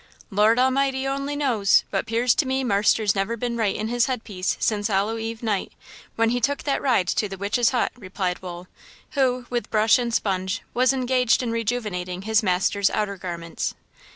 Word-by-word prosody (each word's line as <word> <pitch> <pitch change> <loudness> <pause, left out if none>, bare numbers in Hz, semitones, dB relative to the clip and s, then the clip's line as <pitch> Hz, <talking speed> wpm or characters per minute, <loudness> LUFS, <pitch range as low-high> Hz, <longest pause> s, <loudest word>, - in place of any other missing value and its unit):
"Lord 210 +3 +4
A'mighty 265 +1 +2
o'ny 275 +1 -2
knows; 240 -9 +3
but - - -1
'pears 230 +1 +2
to 280 - 0
me 265 0 0
marster's 210 -1 +2
never 200 +4 -1
been 240 +1 -2
right 220 -4 0
in 215 - -3
his 240 +1 +1
headpiece 210 -7 -2
since 205 -2 0
Hollow 210 +2 0
eve 225 +1 -5
night, 210 -4 -1 0.4
when 230 0 +2
he 245 0 0
took 285 +4 0
that 280 - 0
ride 240 -9 +2
to 210 - 0
the 195 - -7
Witch's 210 +5 +1
Hut," 250 - 0
replied 185 -5 -4
Wool, 180 -1 -8 0.4
who, 255 -3 +1
with 240 -1 -2
brush 215 +2 +4
and 240 -1 -2
sponge, 190 -2 -1
was 255 +2 +3
engaged 255 -2 +2
in 235 - -2
rejuvenating 210 -6 -3
his 220 +1 +2
master's 195 +1 +1
outer 210 -2 -1
garments. 170 -3 -5
225 Hz, 180 wpm, -24 LUFS, 200-250 Hz, 0.4 s, Lord